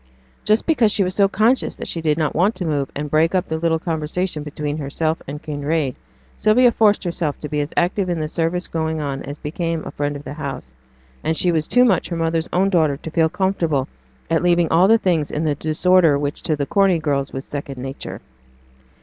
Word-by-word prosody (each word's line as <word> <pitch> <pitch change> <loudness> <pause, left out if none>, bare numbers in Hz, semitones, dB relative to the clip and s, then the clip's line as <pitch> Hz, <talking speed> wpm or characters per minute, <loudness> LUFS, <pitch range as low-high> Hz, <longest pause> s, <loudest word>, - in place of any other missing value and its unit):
Just 215 +2 +2
because 250 -10 +3
she 200 - +2
was 185 0 -2
so 200 +1 +4
conscious 220 +6 +1
that - - -7
she 165 - -4
did 155 -1 +1
not 155 -2 0
want 195 +7 +2
to 180 - -4
move, 145 -4 -1
and 150 +1 -3
break 160 +4 +3
up 185 0 +1
the 160 0 -3
little 165 0 +1
conversation 160 0 -2
between 150 0 -4
herself 155 +3 -2
and 145 +2 -7
Kinraid, 145 -2 -1 0.4
Sylvia 240 +3 +5
forced 210 -3 +3
herself 170 -4 -2
to 150 - -5
be 150 0 -2
as 145 - -4
active 180 +2 +1
in 175 -2 -1
the 155 - -2
service 170 +3 -1
going 160 -1 -2
on 140 -2 -3
as 145 +1 -7
became 165 +2 -3
a - - -6
friend 145 0 -2
of 145 - -8
the - - -7
house; 140 - -6 0.5
and 160 - 0
she 180 - +2
was 155 -2 0
too 250 0 +4
much 195 -8 +2
her 170 - -3
mother's 165 0 -1
own 195 +2 +2
daughter 155 -6 +2
to 160 - -8
feel 160 0 +2
comfortable 165 -8 0 0.4
at 165 0 +1
leaving 175 -1 +3
all 175 +3 +5
the 225 +2 +6
things 170 -8 0
in 150 - -2
the 155 -2 +1
disorder 160 +1 +3
which 145 0 -3
to 155 - 0
the 140 -1 -2
Corney 195 +1 +3
girls 140 -4 -1
was 135 +1 -6
second 140 -2 -6
nature. 135 +1 -7
160 Hz, 220 wpm, -20 LUFS, 150-180 Hz, 0.5 s, the